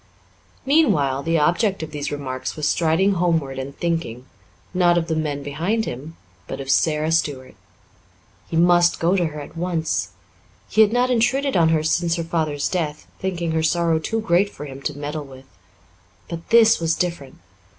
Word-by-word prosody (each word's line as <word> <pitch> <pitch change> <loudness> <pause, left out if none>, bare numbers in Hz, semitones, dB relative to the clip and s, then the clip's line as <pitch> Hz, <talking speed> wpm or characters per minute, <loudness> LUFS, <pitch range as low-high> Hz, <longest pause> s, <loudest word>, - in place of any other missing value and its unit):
Meanwhile, 150 - +3
the 165 +3 0
object 175 +5 +1
of 155 - -7
these 145 -1 -4
remarks 130 -3 -4
was 150 -1 -1
striding 170 +4 +2
homeward 165 -7 0
and 135 +1 -7
thinking, 165 -8 -3 0.5
not 175 -1 +3
of 170 - +1
the 160 - -1
men 150 -3 -2
behind 175 +11 -1
him, 145 +7 -7 0.3
but - - -6
of 135 0 -2
Sara 155 +2 +2
Stuart. 145 -5 -1 1.0
He 165 - -2
must 175 0 +4
go 170 +3 +2
to 175 -3 +1
her 150 -1 -7
at 145 - -10
once. 165 -2 -1 0.6
He 220 - +3
had 215 -1 +5
not 250 +2 +2
intruded 270 +4 +1
on 165 -3 +4
her 160 -1 +2
since 170 +1 +1
her 170 - -2
father's 155 -3 -1
death, 155 -5 -3
thinking 175 -3 -2
her 160 0 0
sorrow 165 0 +1
too 225 +8 -2
great 190 0 +2
for 150 - -9
him 135 -1 -9
to 145 0 -4
meddle 145 +1 -5
with. 135 -1 -13 0.8
But 170 -1 -8
this 230 -1 +6
was 165 -1 +1
different. 170 -7 -3
165 Hz, 175 wpm, -22 LUFS, 145-175 Hz, 1.0 s, this